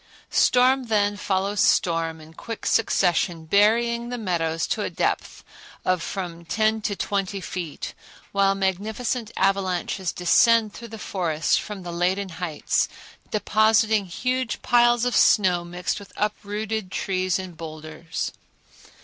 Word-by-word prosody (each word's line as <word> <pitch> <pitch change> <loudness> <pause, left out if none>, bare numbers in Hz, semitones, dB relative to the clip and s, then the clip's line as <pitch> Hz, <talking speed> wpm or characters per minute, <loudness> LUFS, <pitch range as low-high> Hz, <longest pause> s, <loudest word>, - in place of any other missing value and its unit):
Storm 255 +1 +4
then 205 -2 +1
follows 200 0 -1
storm 165 -3 +2
in 155 +1 -14
quick 230 +6 -7
succession, 175 -6 +1
burying 235 +6 +2
the 245 - -3
meadows 165 -6 -1
to - - -2
a - - -1
depth - - -2 0.4
of 185 -2 +1
from 170 -2 -5
ten 220 +5 +1
to 205 -1 -2
twenty 195 0 -2
feet, 175 -3 -5 0.4
while 195 0 +3
magnificent 210 +5 -2
avalanches 190 -1 0
descend 220 +4 +4
through 235 - -9
the 225 0 -9
forests 165 -6 0
from 205 -3 -4
the 175 -1 -6
laden 185 +3 0
heights, 165 -2 -1 0.4
depositing 215 -1 +3
huge 255 +5 -2
piles 240 -1 +4
of 245 - 0
snow 180 -4 +4
mixed 175 +2 -3
with 200 - -13
uprooted 210 -1 -3
trees 185 -2 0
and 185 -2 -7
boulders. 155 +1 -6
195 Hz, 130 wpm, -24 LUFS, 175-220 Hz, 0.4 s, Storm